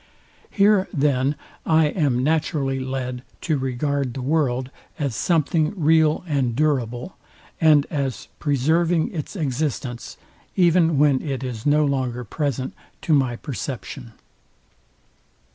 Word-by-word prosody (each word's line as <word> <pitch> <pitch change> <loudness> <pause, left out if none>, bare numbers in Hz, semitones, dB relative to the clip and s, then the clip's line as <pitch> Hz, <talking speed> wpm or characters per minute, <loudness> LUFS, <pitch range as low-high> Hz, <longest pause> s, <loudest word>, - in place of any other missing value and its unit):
Here 200 -1 +3
then 140 -3 +1 0.3
I 160 0 +4
am 140 -7 +1
naturally 145 -3 0
led 130 -1 -4 0.2
to 155 -4 0
regard 130 0 -1
the 130 - -4
world, 130 -3 0 0.3
as 140 -7 -2
something 160 +1 +1
real 160 -2 +3
and 135 -7 0
durable, 130 0 -1 0.4
and 150 -3 +5
as 140 -5 -3
preserving 160 - +1
its 160 +3 -5
existence, 135 -5 -3 0.4
even 170 -3 +4
when 140 -2 +4
it 135 -3 -4
is 125 -1 -4
no 150 +1 +4
longer 130 -3 -1
present 130 +1 -3 0.3
to 160 - +2
my 130 -4 +2
perception. 125 -2 -6
140 Hz, 115 wpm, -23 LUFS, 130-155 Hz, 0.4 s, and